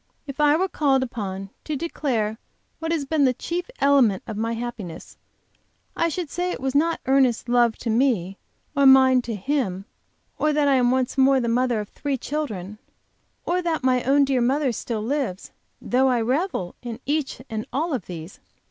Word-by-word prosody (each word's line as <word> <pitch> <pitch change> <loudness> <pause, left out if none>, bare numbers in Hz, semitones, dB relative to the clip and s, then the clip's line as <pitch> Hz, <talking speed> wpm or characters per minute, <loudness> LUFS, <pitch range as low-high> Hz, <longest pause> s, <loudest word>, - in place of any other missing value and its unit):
If 275 -1 -8
I 295 0 +5
were 375 +4 +1
called 275 -7 +1
upon 195 -5 -5
to 305 - -3
declare 245 -8 -2 0.4
what 325 0 -3
has 315 -4 0
been 300 +1 +1
the 255 -2 +3
chief 350 - -4
element 270 -9 +3
of 220 - -6
my 225 +2 -1
happiness, 230 -7 -7 0.8
I 335 - +1
should 345 +1 -3
say 355 +1 -1
it - - -5
was 265 0 -2
not 330 +4 +2
Ernest's 260 -3 +2
love 240 -2 +3
to 230 - -3
me 220 -7 +1 0.4
or 280 -1 +5
mine 260 -1 +7
to 235 -2 -5
him, 200 -4 -2 0.5
or 305 0 +2
that 295 -1 +2
I 280 - +4
am 245 -1 +3
once 260 +1 0
more 265 0 +5
the 240 - -1
mother 240 0 +1
of 210 - -6
three 280 -2 -3
children, 215 -9 -4 0.7
or 360 +1 0
that 330 -5 -1
my 255 -1 +3
own 280 +3 +3
dear 265 -2 +1
mother 265 +2 +2
still 225 -1 -4
lives, 250 -7 -3 0.3
though 260 +2 +2
I 250 -2 +2
revel 250 - -1
in 235 -2 -6
each 295 0 -1
and 220 -2 -5
all 315 +4 -1
of 255 - -3
these. 170 0 -8
260 Hz, 185 wpm, -23 LUFS, 225-290 Hz, 0.8 s, mine